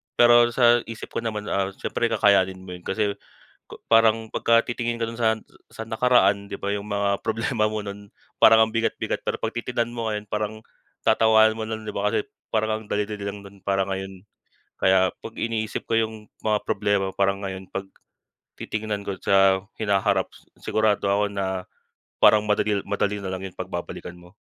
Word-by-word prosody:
pero 120 0 +6
sa 120 0 +4
isip 115 0 -8
ko - - -2
naman 110 -2 -3 0.3
siyempre 120 - -1
kakayanin 95 -4 +2
mo 90 - -9
'yon 90 -1 -9
kasi 100 -1 -1 0.7
parang 115 0 +4
pagka 115 +1 +2
titingin 120 -1 -2
ka 115 - -1
do'n 115 - -6
sa 110 -1 +1 0.3
sa 110 - -8
nakaraan, 105 -4 +2
'di - - -5
ba, 100 +1 -2
yung 100 0 -5
mga 100 -1 0
problema 110 -1 0
mo 110 - -3
no'n 100 0 -9 0.3
parang 110 0 +8
ang 110 - -9
bigat-bigat. 115 0 -1
Pero - - -2
'pag 115 - -3
titignan 120 0 -2
mo 115 -2 -2
ngayon 105 0 -4
parang 105 +1 -3 0.5
tatawanan 110 0 +5
mo 110 - -5
nalang, 110 0 -5
'di - - -5
ba, - - 0
kasi 420 -1 -1 0.2
parang 110 0 0
ang - - -16
dali-dali 105 0 -2
lang 100 0 -4
no'n 100 -1 -16
para 95 -1 0
ngayon. 95 0 -6 0.6
Kaya 95 -1 +4
'pag 115 - -8
iniisip 110 -1 -2
ko 115 - -1
yung 110 -1 -1 0.2
mga 105 -1 +2
problema 100 -1 0
parang 100 0 +1
ngayon 95 0 -7
'pag 95 0 -4 0.7
titingnan 110 -1 -4
ko 100 -2 -5
sa 95 0 +3 0.2
hinaharap 100 -2 +1 0.3
sigurado 105 -2 +1
ako 100 0 +1
na 95 -2 -2 0.6
parang 105 0 +6
madali 105 0 +1
madali 100 0 -1
nalang 95 -1 -5
yun - - -24
'pag 95 0 -5
babalikan 85 0 -6
mo. 90 +2 -17
105 Hz, 175 wpm, -24 LUFS, 100-110 Hz, 0.7 s, parang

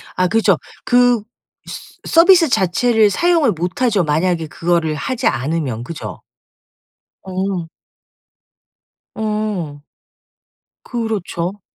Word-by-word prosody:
아 185 0 +2
그렇죠. 210 -4 +3 0.3
그 245 -3 +3 0.4
스 - - -10
서비스 340 0 +6
자체를 220 +3 +3
사용을 330 - +2
못 180 +6 -4
하죠 215 -7 +2
만약에 165 +2 0
그거를 165 -1 0
하지 245 - -2
않으면. 130 -2 -2
그죠? 115 - -7 1.0
어 190 - -9
음. 180 -4 -3 1.5
어. 210 -9 -3 1.1
그렇죠. 205 -5 -3
190 Hz, 190 characters per minute, -18 LUFS, 165-225 Hz, 1.5 s, 서비스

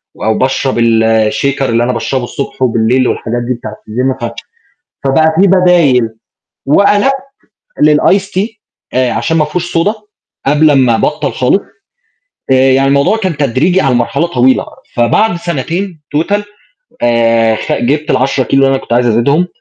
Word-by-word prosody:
و - - -9
أو 110 0 +1
باشرب 135 0 0
الShaker 115 +4 +1
اللي 115 -3 +1
أنا 125 +1 -1
باشربه 125 +2 -2
الصبح 135 +2 -6
وبالليل 125 +1 +1
والحاجات 120 +1 -2
دي 125 - 0
بتاعة 120 -3 -8
الGym 125 +3 -3
ف - - -8 0.7
فبقى 160 +4 +2
في 200 - +5
بدايل، 175 -9 +3 0.6
وقلبت 205 - +3 0.7
للIce 190 +6 +3
tea 190 +3 -1 0.5
آآ، 130 -1 +1
عشان 165 - -1
ما 155 - +2
فيهوش 175 +2 -3
Soda 200 +6 +1 0.5
قبل 150 +2 +3
ما 130 -4 +3
أبطّل - - -1
خالص، - - +1 0.9
آآ، - - +6 0.2
يعني 135 +1 +2
الموضوع 140 +10 +2
كان 185 -8 -3
تدريجي 150 +7 +1
على 130 -2 +1
مرحلة 145 +7 0
طويلة، 130 -5 +2 0.3
فبعد 170 - +2
سنتين 170 +2 -4 0.2
Total 200 +6 0 0.6
آآ، 115 -1 +2
خ - - -5
جبت 150 +6 -1
ال10 130 +1 +1
كيلو 135 +3 +1
اللي 135 0 +3
أنا 135 - -4
كنت - - -4
عايز 120 +1 +2
أزيدهم، 140 +10 +2
135 Hz, 155 wpm, -12 LUFS, 120-165 Hz, 0.9 s, آآ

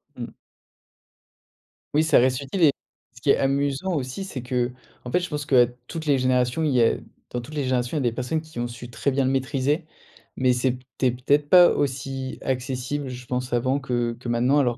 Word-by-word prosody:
Mmh. - - -6 1.6
Oui, 155 +2 +4
ça 160 - +4
reste 125 +1 +2
utile 140 +6 -2
et 150 - +7 0.4
ce 120 - -15
qui 140 - -1
est - - +6
amusant 140 +6 0
aussi, 140 +5 -3
c'est 135 -10 -6
qu'en 125 0 -4
fait, 180 - +3
je 175 - -4
pense 150 -1 -3
qu'à 125 -5 +5 0.2
toutes 165 -1 -6
les 145 -2 +3
générations, 125 +3 +1
il 155 - +2
y 125 -2 +3
a 115 - +3 0.3
dans 120 - -3
toutes 145 +6 -10
les 145 - -1
générations, 130 +2 0
il 145 - 0
y - - +2
a - - +4
des - - -8
personnes 130 +6 -1
qui 155 -6 -9
ont 120 - -1
su 120 0 -9
très 110 +3 -1
bien 135 +1 +1
le 130 - +2
maîtriser, 135 +3 0 0.5
mais 130 -1 +3
c'était 125 0 -1
peut-être 140 +4 +1
pas 180 -1 +8
aussi 135 -1 -2
accessible, 130 +2 -2
je 125 0 -8
pense 125 +1 -3
avant, 130 +3 +1
que 120 -3 -1
que 125 - -8
maintenant 125 +5 +3
alors 120 -4 +1
130 Hz, 210 wpm, -24 LUFS, 125-145 Hz, 1.6 s, pas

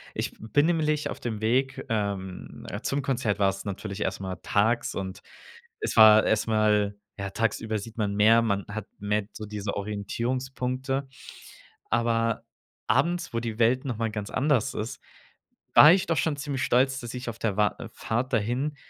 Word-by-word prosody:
ich - - -2
b - - -22
bin 145 +5 +3
nämlich 155 -3 +1
auf - - -7
dem 110 -3 -4
Weg, 130 +4 0
ähm, 100 -4 -3 0.2
zum 140 0 -1
Konzert 120 -7 0
war 100 -1 +3
es 95 0 -6
natürlich 100 0 -5
erst - - -1
mal 95 -1 -5
tags, 110 +4 +1
und 95 0 -5 0.6
es - - -2
war 110 -1 +8
erst 110 +1 +1
mal 105 -2 +2 0.2
ja, 100 - -3
tagsüber 110 +1 -1
sieht 110 +2 -8
man 105 -2 -1
mehr, 110 +3 +6
man 100 -3 0
hat 105 0 -6
mehr 105 0 -1
so 110 - -7
diese 105 -1 -4
Orientierungspunkte. 130 +6 -3 0.8
Aber 115 -1 +1 0.4
abends, 170 +7 +1
wo 115 - 0
die 115 -1 -5
Welt 125 +4 +3
noch 125 -5 -3
mal 115 -1 -1
ganz 105 -1 -5
anders 135 -3 +1
ist, 110 +3 -5 0.8
war 150 - +10
ich 190 - +1
doch 165 - +1
schon 150 +1 +1
ziemlich 140 -2 -3
stolz, 130 +2 +2
dass 120 -1 -7
ich 125 -1 -5
auf 115 - -7
der 105 -3 -1
Wa 105 -2 +2 0.2
Fahrt 125 +4 -2
dahin 125 +7 0
115 Hz, 175 wpm, -27 LUFS, 105-130 Hz, 0.8 s, war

